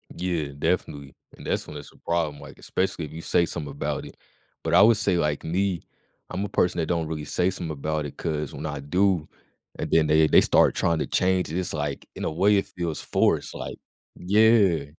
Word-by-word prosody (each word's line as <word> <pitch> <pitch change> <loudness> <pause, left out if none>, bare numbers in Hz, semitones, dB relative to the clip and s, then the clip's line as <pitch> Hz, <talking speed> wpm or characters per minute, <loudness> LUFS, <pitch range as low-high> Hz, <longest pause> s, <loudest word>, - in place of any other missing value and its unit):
Yeah, 85 -4 -2
definitely, 70 -1 -2 0.2
and - - -12
that's - - -1
when 75 - -8
it's 70 - -10
a - - -22
problem, 80 -4 -1
like, - - -12
especially 90 -3 -2
if 75 - -11
you 80 - -7
say 85 - +2
something 80 -4 -5
about 70 +1 -3
it, - - -12 0.5
but 80 0 -1
I 90 - +7
would 115 0 +6
say 95 -4 +1
like 75 -3 0
me, 90 +1 -1 0.5
I'm 95 +3 -2
a - - -6
person 90 -3 +1
that 80 - -1
don't 85 -2 -1
really 75 -2 -4
say 90 +4 +1
some 90 -3 -5
about 75 +1 -2
it 75 - -8
'cause 75 -3 -3
when 75 +3 -6
I 75 -2 -4
do, 90 +2 +1 0.5
and - - -4
then 80 -2 +4
they 80 +1 +5
they - - +6
start - - +4
tryna 85 -2 0
change 90 -3 +1
it, 85 - -2
it's 90 -2 -3
like, 75 -2 -3
in - - -4
a - - -1
way, 100 +5 +3
it 100 - +1
feels 85 -3 -4
forced, - - +1
like - - -6 0.4
yeah. 100 -4 +4
80 Hz, 215 wpm, -25 LUFS, 75-90 Hz, 0.5 s, I